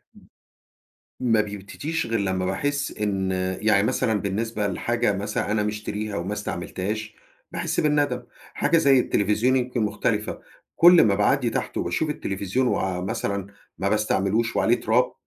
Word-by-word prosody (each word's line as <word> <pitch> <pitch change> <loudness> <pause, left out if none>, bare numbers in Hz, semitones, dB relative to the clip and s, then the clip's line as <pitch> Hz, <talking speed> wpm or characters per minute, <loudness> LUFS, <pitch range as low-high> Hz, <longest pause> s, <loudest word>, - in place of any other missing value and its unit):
م - - -17 1.0
ما 115 -4 +3
بيبتديش 105 +11 -4
غِير 115 -1 0
لمّا 95 -2 -1
باحس 140 +9 -1
إن 95 -2 -1 0.3
يعني 105 -2 +4
مثلًا 110 0 +1
بالنسبة 105 +2 -2
لحاجة 115 +4 0
مثلًا 100 +1 -2
أنا 105 0 +1
مشتريها 105 0 -3
وما 90 +4 -3
استعملتهاش 105 +2 -4 0.4
باحس - - -1
بالندم. 145 -4 +1 0.3
حاجة 165 - +2
زي 140 -4 +5
التليفزيون 105 +5 +1
يمكن 125 -2 -1
مختلِفة، 105 0 -1 0.4
كلّ 175 0 +8
ما 100 -3 +3
باعدّي 105 +1 +2
تحت - - -3
وباشوف 155 - -1
التليفزيون 100 0 -1
ومثلًا 95 +1 -2 0.3
ما 100 - 0
باستعملوش 110 +2 +1
وعليه 120 +2 +2
تراب 120 +3 +2
105 Hz, 135 wpm, -24 LUFS, 100-125 Hz, 1.0 s, كلّ